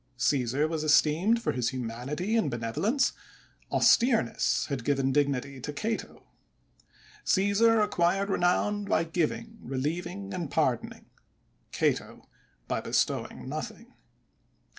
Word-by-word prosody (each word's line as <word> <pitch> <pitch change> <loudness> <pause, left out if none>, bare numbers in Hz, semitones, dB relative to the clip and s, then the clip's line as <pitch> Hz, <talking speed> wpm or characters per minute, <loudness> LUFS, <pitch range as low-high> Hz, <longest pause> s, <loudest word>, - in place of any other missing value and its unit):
Caasar 130 +3 +1
was 160 -1 -3
es 155 -1 +6
teemed 190 +10 +1
for - - +1
his 125 -2 0
humanity 130 - -3
and 220 -10 +2
benevolence; 130 - 0 0.6
austereness 235 -2 +3
had 140 -5 -4
given 135 0 +1
dignity 140 -1 0
to 150 - -4
Cato. 220 +10 -4 1.0
Caesar 205 +4 +3
acquired 195 0 +1
renown 205 +3 +1
by 180 -4 +2
giving, 175 +7 -2
relieving 175 +9 -4
and 175 -5 -4
pardoning; 130 -7 -1 0.7
Cato - - -1 0.4
by - - -1
bestowing - - -1
nothing. - - -6
160 Hz, 110 wpm, -28 LUFS, 135-200 Hz, 1.0 s, es